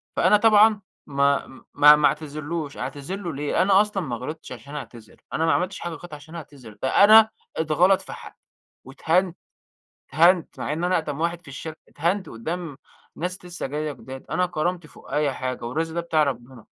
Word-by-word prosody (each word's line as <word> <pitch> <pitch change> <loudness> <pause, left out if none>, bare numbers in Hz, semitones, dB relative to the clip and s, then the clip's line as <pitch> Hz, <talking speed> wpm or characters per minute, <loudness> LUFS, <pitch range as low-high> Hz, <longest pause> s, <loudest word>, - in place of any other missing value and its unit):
فأنا 210 - +5
طبعًا 215 -1 +5 0.3
ما 140 0 +1 0.3
ما 150 +1 +8
ما 150 - +4
أعتذرلوش 155 0 -4
أعتذر 145 +7 -5
له 180 -5 -5
ليه؟ 145 +4 -1
أنا 195 +1 +5
أصلًا 210 -3 -2
ما 125 -5 -3
غلطتش 155 +7 -7
عشان 135 +4 -9
أعتذر، 120 -6 -10
أنا 160 - +1
ما 165 - +3
عملتش 185 +2 -1
حاجة 170 - -5
غلط 165 +1 -10
عشان 150 +3 -11
أعتذر، 135 -9 -11
ده 130 +9 +4
أنا 220 +1 +8 0.3
إتغلَط 165 +5 +3
في - - -9
حقي - - -12 0.5
وإتهانت 170 +6 0 0.7
إتهانت 170 +4 +3
مع - - -2
إن 165 +3 -2
أنا 180 - +1
أقدَم 150 -1 -5
واحد 170 +1 -1
في 150 - -16
الشركة، 155 +3 -8
إتهانت 180 +6 -1
قدّام 160 +5 -6 0.4
ناس 180 +2 -4
لسّه 175 -3 -5
جايّة 150 +2 -3
جداد 130 -1 -10
أنا 180 - +1
كرامتي 175 0 -3
فوق - - -16
أي 150 -2 +1
حاجة، 130 -1 -4
والرزق 160 +7 -3
ده 170 - 0
بتاع 165 -2 +1
ربنا، 125 -4 -4
160 Hz, 180 wpm, -24 LUFS, 140-180 Hz, 0.7 s, ما